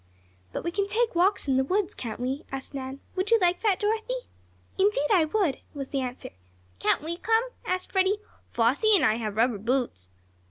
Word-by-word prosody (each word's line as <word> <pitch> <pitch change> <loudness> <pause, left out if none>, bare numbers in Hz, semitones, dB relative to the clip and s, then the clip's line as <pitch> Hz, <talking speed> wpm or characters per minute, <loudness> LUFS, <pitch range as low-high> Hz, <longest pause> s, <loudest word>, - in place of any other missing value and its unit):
"But - - -4
we 345 - -1
can 395 +2 0
take 450 +3 +1
walks 360 0 +2
in 265 -1 +3
the 265 - +3
woods; 375 +7 0
can't 225 -3 -6
we?" 260 +3 -2
asked 270 +1 -6
Nan. 270 0 -6
"Would 370 +1 -1
you 460 - +6
like 355 -1 +2
that, 415 -4 +2
Dorothy?" 445 +4 -1 0.6
"Indeed 380 -7 +2
I 345 -5 +5
would," 315 -5 0 0.2
was 275 -2 -5
the 275 - -1
answer. 255 -1 -5 0.5
"Can't - - +2
we 335 +2 -3
come?" 450 +5 +1 0.2
asked 365 0 -2
Freddie. 380 +1 +3 0.3
"Flossie 275 - +3
and 315 -9 +4
I 220 -2 +3
have 215 -3 -4
rubber 230 -2 +2
boots." 230 - -1
335 Hz, 195 wpm, -27 LUFS, 260-405 Hz, 0.6 s, you